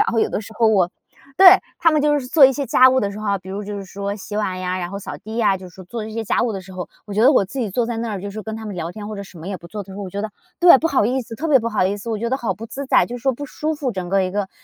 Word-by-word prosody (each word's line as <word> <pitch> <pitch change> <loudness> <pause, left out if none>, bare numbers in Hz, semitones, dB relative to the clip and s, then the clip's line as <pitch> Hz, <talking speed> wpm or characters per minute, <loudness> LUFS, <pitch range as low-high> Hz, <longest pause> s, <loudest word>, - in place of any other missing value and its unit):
然 420 - +3
后 230 - 0
有 - - +2
的 - - -2
时 220 - -11
候 230 - +3
我 185 -5 +3 0.5
对！ 385 - +8 0.3
他 330 - +4
们 305 -2 +2
就 295 -1 +3
是 255 - -8
做 280 +2 +6
一 270 - +2
些 280 +1 -3
家 255 +1 +6
务 260 - +2
的 200 - -1
时 200 - -8
候 215 - -5
啊， 200 -1 +1
比 185 0 -14
如 200 +2 -5
就 205 0 -5
是 195 - -6
说 200 +1 -4
洗 205 0 -7
碗 190 -3 -1
呀， 185 0 -2
然 175 0 -4
后 200 - -5
扫 200 - -7
地 220 +1 -8
呀， 210 -4 +3
就 185 -1 -10
是 185 +2 -13
做 225 +4 -6
一 220 - -8
些 225 0 -3
家 - - +1
务 235 -2 0
的 195 - -4
时 190 +1 -13
候， 180 -1 -6 0.2
我 205 - -6
觉 215 - +2
得 265 +5 +7
我 230 - +4
自 200 +8 -8
己 230 -5 -1
坐 235 +4 0
在 235 -1 -3
那 230 0 -3
儿 195 - -4
就 200 +2 -6
是 215 +2 -7
跟 220 +1 -6
他 220 - -7
们 205 - -5
聊 170 0 -4
天， 210 +1 -8
或 215 - -6
者 200 - -5
什 190 -3 -13
么 165 +4 -8
也 195 - -3
不 170 - -13
做 210 +1 -5
的 195 - -12
时 190 - -9
候， 205 - -5
我 185 - -7
觉 200 - -4
得 220 - -2 0.3
对， 345 -4 +9
不 330 - 0
好 265 -8 +2
意 260 +2 0
思， 230 -1 -9
特 320 +8 -3
别 280 -3 +6
不 230 -1 -2
好 215 -4 +1
意 200 +2 -1
思。 205 +3 -6
我 220 - -2
觉 235 - -2
得 265 - +1
好 230 -7 -2
不 220 +5 -8
自 270 +4 -6
在， - - +4
就 245 - -6
是 240 - -12
说 265 0 +2
不 285 +4 -7
舒 310 +3 -3
服 280 -5 -3
整 185 -3 -5
个 195 +2 +2
儿 - - +4
一 185 - -1
个 205 +2 -1
儿， 190 - -9
215 Hz, 425 characters per minute, -21 LUFS, 195-245 Hz, 0.5 s, 对